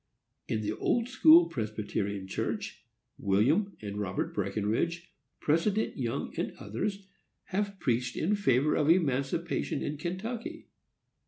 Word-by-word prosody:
In 110 - -1
the 105 0 -1
Old 235 - 0
school 320 +6 +7
Presbyterian 105 - -3
Church, 95 - -4 0.4
William 140 - +2
and 100 0 -4
Robert 95 -2 -2
Breckenridge, 105 - -1 0.3
President 190 +8 +1
Young, 120 -4 -3
and - - -2
others, 195 - -3 0.5
have 200 0 -1
preached 125 -3 0
in 195 +7 +2
favor 145 -7 +3
of 150 -1 +2
emancipation 160 -1 +1
in 150 - -3
Kentucky. 230 - -5
150 Hz, 115 wpm, -30 LUFS, -, 0.5 s, school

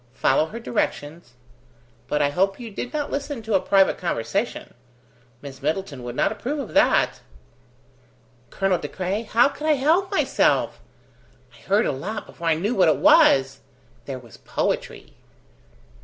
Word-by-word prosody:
Follow 150 +4 +2
her 225 +7 -8
directions. 165 - -3 0.7
But 150 - 0
I 140 - +2
hope 195 - 0
you 235 -3 -8
did 245 +4 -6
not 295 -1 -3
listen 280 -4 -4
to 220 0 -3
a 190 - +5
private 195 +1 +3
conversation. 185 - -3 0.7
Miss 135 -1 -10
Middleton 155 -2 -3
would 120 0 -7
not - - +1
approve 245 +7 -4
of 275 -5 -6
that." - - +3 1.3
"Colonel 195 -2 0
De 145 - -5
Craye, 190 +6 -3
how 230 +2 +3
could 300 +2 -6
I 310 - +5
help 320 +8 +2
myself? 390 - +1 0.8
I - - -19
heard 205 +4 +3
a - - +1
lot 195 +11 -5
before 170 - -7
I 160 - +4
knew 200 +9 -1
what 190 -7 +4
it - - +2
was. 135 0 +5 0.5
There 135 -2 -5
was 120 -3 -15
poetry!" - - -3
195 Hz, 155 wpm, -23 LUFS, 150-235 Hz, 1.3 s, a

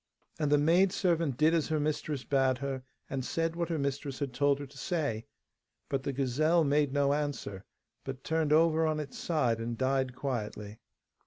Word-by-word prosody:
And 150 -2 +1
the 145 - +6
maidservant 170 - +2
did 155 +4 +4
as 165 -3 +2
her 155 -1 0
mistress 150 -2 -2
bade 135 -2 +2
her, 135 0 -3 0.3
and 135 -1 -3
said 165 +5 -1
what 170 0 -2
her 165 - 0
mistress 140 -1 -2
had 140 -4 -3
told 140 +2 +3
her 145 - -6
to 140 +1 -15
say, 140 -9 -2 0.6
but 135 - 0
the 140 - -2
gazelle 145 +6 +2
made 145 -1 +2
no 140 0 +2
answer, 145 -10 -3 0.4
but 135 0 -6
turned 160 -2 0
over 160 0 +4
on 155 -1 0
its 140 -3 -6
side 125 -9 +1
and 115 0 -3
died 130 0 0
quietly. 110 -5 -4
145 Hz, 180 wpm, -30 LUFS, 130-155 Hz, 0.6 s, the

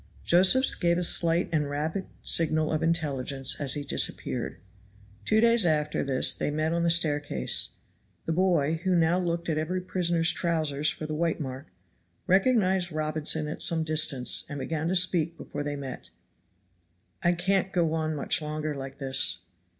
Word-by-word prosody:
Josephs 190 +10 +4
gave 170 -1 +1
a 180 - -1
slight 170 0 +4
and 150 -3 0
rapid 155 +6 -3 0.2
signal 155 -1 +2
of 155 0 -1
intelligence 140 -5 0
as 140 -1 +2
he 145 - -4
disappeared. - - -2 0.7
Two 215 - +2
days 230 -1 +4
after 150 -3 0
this 135 -2 +2
they - - -2
met 155 +2 -1
on 170 - 0
the 170 - +2
staircase. 145 - +1 0.5
The - - -2
boy, 165 -3 +1
who 185 -2 +1
now 170 +1 +2
looked 170 -1 -3
at 155 -2 -1
every 175 +4 -2
prisoner's 175 -2 0
trowsers 155 -4 -1
for 155 - -5
the 155 - -5
white 165 +1 -1
mark, 135 0 -6 0.6
recognized 190 -3 +2
Robinson 155 0 -1
at 150 - -6
some 165 -1 +3
distance 155 -5 +1
and 145 - -6
began 155 +3 -3
to 185 - 0
speak 170 -2 +1
before - - -7
they 145 0 -3
met. 135 -3 -8 1.1
"I 175 - +2
can't 190 +2 0
go 170 -4 0
on 155 -1 -2
much 150 +4 +1
longer 155 0 -4
like 135 -1 -8
this." 135 -9 0
160 Hz, 165 wpm, -27 LUFS, 150-175 Hz, 1.1 s, Josephs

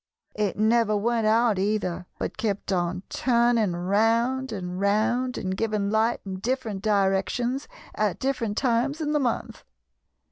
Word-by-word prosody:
It 210 -3 -1
never 220 0 +3
went 225 +1 +1
out, 225 -2 +3
either, 190 -3 -1
but - - -4
kept 205 -3 -2
on 180 +1 -1
turning 235 -5 +2
round 225 +8 +1
and 180 -3 -5
round 235 +5 +1
and 190 0 -2
giving 210 -1 -1
light 220 +2 +1
in 190 -1 -5
different 230 -3 -2
directions 210 +6 0 0.3
at - - 0
different 245 -6 -2
times 260 +4 +1
in 300 -2 -1
the 300 - +2
month. 245 -5 -2
220 Hz, 140 wpm, -25 LUFS, 200-240 Hz, 0.3 s, never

